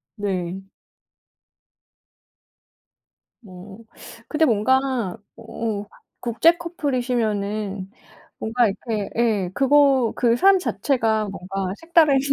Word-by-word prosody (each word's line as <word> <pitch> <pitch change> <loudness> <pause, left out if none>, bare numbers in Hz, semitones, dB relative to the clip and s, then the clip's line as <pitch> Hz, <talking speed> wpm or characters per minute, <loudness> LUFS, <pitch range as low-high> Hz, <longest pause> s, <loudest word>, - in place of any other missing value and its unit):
네. 190 -3 -3 2.8
뭐 195 +1 -12 0.5
근데 315 +1 +2
뭔가 250 - +1 0.2
어 225 -2 -4 0.4
국제 320 +9 +3
커플이시면은 220 - -2 0.5
뭔가 230 0 +1
이렇게 210 0 -4
예. 210 -6 +1
그거 275 -3 +4
그 235 -1 +2
삶 385 +7 +5
자체가 225 - 0
뭔가 190 0 -4
색다른 325 -4 +4
225 Hz, 160 characters per minute, -22 LUFS, 200-270 Hz, 2.8 s, 삶